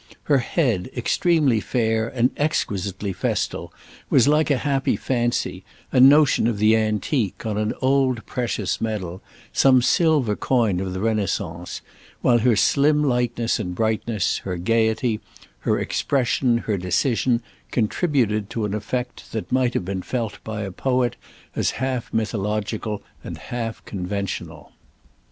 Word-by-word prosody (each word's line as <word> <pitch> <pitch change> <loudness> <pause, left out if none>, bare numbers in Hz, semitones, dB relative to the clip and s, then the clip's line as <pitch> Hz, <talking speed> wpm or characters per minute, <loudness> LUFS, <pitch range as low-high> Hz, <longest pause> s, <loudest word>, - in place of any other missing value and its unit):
Her 145 -3 +3
head, 120 - 0
extremely 145 -1 +2
fair 110 -1 0
and 125 +1 +1
exquisitely 100 - -1
festal, - - -2 0.4
was 125 -1 +5
like 150 +1 +3
a 140 - +3
happy 135 0 0
fancy, 120 -2 -1 0.3
a - - +3
notion 140 -2 +6
of 115 -3 0
the 105 +2 +4
antique, 110 - -1
on 105 -1 -1
an 105 0 -1
old 130 -3 +2
precious 115 -5 -2
medal, 95 -5 -3 0.3
some 130 -1 +5
silver 145 -6 +3
coin 115 -8 +1
of 95 -1 -3
the 95 - -4
Renaissance; 100 -5 -2 0.4
while 120 -1 +4
her 120 0 +3
slim 150 +7 +3
lightness 120 -3 0
and 90 0 -4
brightness, 110 -1 0
her 90 -2 -4
gaiety, 110 +3 +1 0.4
her - - +1
expression, 125 -2 +1
her 110 -3 -2
decision, 115 +6 +1 0.3
contributed 110 - 0
to 115 -2 -2
an 105 - -3
effect 120 +4 -4
that 110 - -4
might 125 -1 +2
have - - -1
been 95 0 -3
felt 115 -2 -4
by 110 -1 -4
a 100 - -5
poet 125 +4 0 0.4
as - - +1
half 130 -1 -2
mythological 105 0 -2 0.2
and - - -6
half 115 -2 -5
conventional. 90 -6 -5
115 Hz, 135 wpm, -23 LUFS, 105-130 Hz, 0.4 s, notion